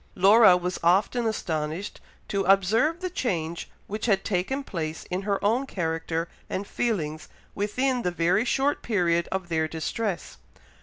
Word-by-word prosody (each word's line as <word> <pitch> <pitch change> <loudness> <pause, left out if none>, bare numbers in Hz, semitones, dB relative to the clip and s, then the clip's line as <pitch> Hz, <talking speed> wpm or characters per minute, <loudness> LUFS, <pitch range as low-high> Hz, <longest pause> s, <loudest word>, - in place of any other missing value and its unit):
Laura 200 0 +7
was 180 +1 -3
often 200 +7 +2
astonished 165 -3 -3 0.3
to 200 - -1
observe 215 - +3
the 365 - -2
change 170 - -2 0.2
which 215 +3 -4
had 195 -3 +2
taken 220 +8 -1
place 160 -8 -4
in 180 +1 -1
her 200 0 0
own 245 +6 +2
character 165 -2 -2 0.2
and 195 - -3
feelings 160 -11 -2 0.2
within 250 +5 0
the 180 - 0
very 175 +4 +2
short 275 +3 +1
period 170 -6 +1
of 190 -2 -2
their 160 -2 0
distress. 175 +5 -3
190 Hz, 145 wpm, -26 LUFS, 170-225 Hz, 0.3 s, Laura